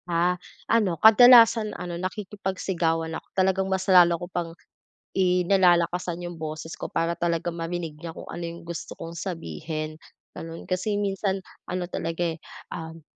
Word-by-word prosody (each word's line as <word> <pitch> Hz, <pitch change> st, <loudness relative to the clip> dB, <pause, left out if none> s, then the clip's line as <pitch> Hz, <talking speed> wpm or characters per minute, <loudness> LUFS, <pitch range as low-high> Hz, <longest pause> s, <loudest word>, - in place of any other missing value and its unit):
Ah, 175 Hz, +1 st, +2 dB, 0.3 s
ano 205 Hz, -7 st, +2 dB
kadalasan 225 Hz, -, +7 dB
ano 175 Hz, -1 st, -5 dB
nakikipagsigawan 185 Hz, -4 st, -2 dB
ako -, -, -7 dB
talagang 190 Hz, 0 st, +2 dB
mas 190 Hz, 0 st, -1 dB
lalo 175 Hz, -3 st, +6 dB
ko 175 Hz, -, -6 dB
pang 170 Hz, -2 st, -2 dB, 0.6 s
i 180 Hz, -1 st, +3 dB
nilalakasan 175 Hz, -2 st, +2 dB
yung 175 Hz, -1 st, -7 dB
boses 155 Hz, +1 st, -5 dB
ko -, -, -5 dB
para 165 Hz, +1 st, 0 dB
talaga 170 Hz, 0 st, 0 dB
marinig 165 Hz, -1 st, -4 dB
niya 165 Hz, 0 st, -7 dB
kung -, -, -9 dB
ano 170 Hz, -, -6 dB
yung 170 Hz, 0 st, -7 dB
gusto 170 Hz, -1 st, -6 dB
kong 165 Hz, -, -7 dB
sabihin, 160 Hz, -3 st, -5 dB, 0.4 s
ganon. 165 Hz, 0 st, -8 dB
Kasi 190 Hz, +3 st, 0 dB
minsan 195 Hz, -1 st, -1 dB, 0.3 s
ano 180 Hz, 0 st, -2 dB
talaga, 165 Hz, 0 st, -3 dB
eh, -, -, -18 dB, 0.3 s
um 160 Hz, 0 st, -7 dB
175 Hz, 150 wpm, -25 LUFS, 165-190 Hz, 0.6 s, kadalasan